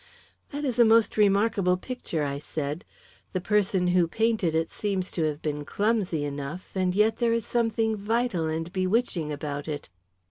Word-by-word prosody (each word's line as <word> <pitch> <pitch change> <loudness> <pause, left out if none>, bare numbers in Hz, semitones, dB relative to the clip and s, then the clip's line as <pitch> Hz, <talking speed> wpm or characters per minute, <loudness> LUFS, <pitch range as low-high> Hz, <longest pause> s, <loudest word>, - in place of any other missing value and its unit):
"That 290 0 -4
is 250 -3 -1
a - - +9
most 225 0 +4
remarkable 200 -2 +3
picture," 185 -8 -4
I 140 0 -2
said. 150 +2 -4 0.5
"The 185 - 0
person 190 -2 +1
who 175 -1 +3
painted 215 -4 +1
it 160 0 0
seems 195 -3 -2
to 165 - 0
have 150 -1 -3
been 150 -1 -2
clumsy 200 -4 0
enough, 145 +5 -6
and 185 -1 0
yet 215 +2 +3
there 235 -1 +2
is 230 -2 0
something 225 -2 +1
vital 210 -4 0
and 165 +2 -3
bewitching 185 -4 0
about 145 0 -4
it." 150 -2 -5
185 Hz, 170 wpm, -27 LUFS, 160-225 Hz, 0.5 s, a